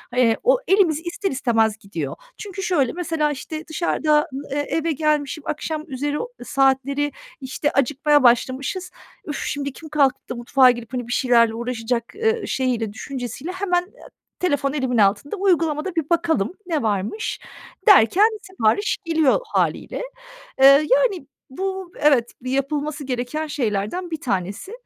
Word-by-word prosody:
eee, 240 Hz, -3 st, +3 dB
o -, -, +5 dB
elimiz 370 Hz, -6 st, +3 dB
ister 390 Hz, +2 st, -2 dB
istemez 225 Hz, -5 st, +1 dB
gidiyor. 200 Hz, -2 st, -5 dB, 0.2 s
Çünkü 390 Hz, -2 st, -6 dB
şöyle, 295 Hz, -10 st, +1 dB
mesela, 325 Hz, -3 st, -1 dB
işte, 310 Hz, +3 st, -6 dB
dışarıdan, 305 Hz, -2 st, +1 dB, 0.3 s
eee, 285 Hz, -, -1 dB
eve 325 Hz, 0 st, 0 dB
gelmişim, 305 Hz, 0 st, 0 dB
akşamüzeri 295 Hz, -2 st, -3 dB, 0.3 s
saatleri, 270 Hz, 0 st, +2 dB, 0.5 s
işte, 265 Hz, +3 st, -2 dB
acıkmaya 290 Hz, +2 st, +2 dB
başlamışız. 260 Hz, -, +1 dB, 0.3 s
"Üf, 295 Hz, -, -4 dB
şimdi 280 Hz, -1 st, -3 dB
kim 315 Hz, +3 st, -11 dB
kalkıp 275 Hz, -3 st, +1 dB
da 250 Hz, -, -3 dB
mutfağa 250 Hz, +2 st, +4 dB
girip, 240 Hz, 0 st, -8 dB
hani, 245 Hz, -2 st, -3 dB
bir -, -, -6 dB
şeylerle 235 Hz, -3 st, +3 dB
uğraşacak?" 235 Hz, 0 st, -2 dB
ııı, 445 Hz, 0 st, 0 dB
şeyiyle, 240 Hz, -5 st, -1 dB
düşüncesiyle 260 Hz, -, -6 dB
hemen, 370 Hz, -2 st, 0 dB
eee, 370 Hz, -, -17 dB, 0.3 s
telefon 285 Hz, -6 st, 0 dB
elimin 260 Hz, -4 st, -1 dB
altında, 205 Hz, -, +2 dB
"Uygulamada 345 Hz, -3 st, +1 dB
bir 320 Hz, -3 st, -1 dB
bakalım 335 Hz, -, +1 dB
ne 325 Hz, -6 st, -1 dB
varmış?" 210 Hz, -, -2 dB, 0.5 s
derken 405 Hz, -, +6 dB
sipariş 380 Hz, -, 0 dB
geliyor 320 Hz, -4 st, +3 dB
hâliyle. -, -, -1 dB, 0.6 s
Eee, -, -, +8 dB, 0.3 s
yani, 485 Hz, -, +2 dB, 0.2 s
bu 380 Hz, +5 st, -4 dB
evet, 270 Hz, -6 st, +3 dB
yapılması 285 Hz, +3 st, -2 dB
gereken 260 Hz, +4 st, -3 dB
şeylerden 250 Hz, -, -2 dB
bir 320 Hz, -, -4 dB
tanesi. 200 Hz, -, -3 dB
290 Hz, 135 wpm, -22 LUFS, 250-335 Hz, 0.6 s, Eee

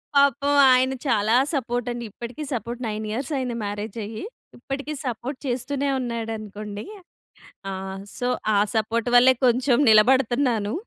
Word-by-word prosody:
పాపం 280 Hz, 0 st, +3 dB, 0.2 s
ఆయన 260 Hz, +1 st, +3 dB
చాలా 220 Hz, -2 st, +2 dB, 0.2 s
సపోర్ట్ 245 Hz, -3 st, -2 dB
అండి. 240 Hz, 0 st, -5 dB
ఇప్పటికి 240 Hz, +8 st, -7 dB
సపోర్ట్ 240 Hz, +1 st, -4 dB
నైన్ 215 Hz, 0 st, -4 dB
ఇయర్స్ 260 Hz, +6 st, -4 dB
అయ్యింది. 250 Hz, -2 st, -2 dB
మ్యారేజ్ 205 Hz, +1 st, -5 dB
అయ్యి. 215 Hz, +1 st, -7 dB, 0.3 s
ఇప్పటికి 275 Hz, +4 st, -5 dB
సపోర్ట్ 255 Hz, +2 st, -4 dB
చేస్తూనే 270 Hz, +3 st, -2 dB
ఉన్నాడనుకోండి. 215 Hz, -3 st, -5 dB, 0.9 s
ఆ! -, -, -4 dB, 0.5 s
సో, 245 Hz, -, -2 dB, 0.3 s
ఆ -, -, +3 dB, 0.2 s
సపోర్ట్ 225 Hz, +2 st, 0 dB
వల్లే 250 Hz, +2 st, +7 dB
కొంచెం 250 Hz, +1 st, +3 dB
నిలబడుతున్నాను. 240 Hz, -1 st, +3 dB
240 Hz, 125 wpm, -24 LUFS, 220-260 Hz, 0.9 s, వల్లే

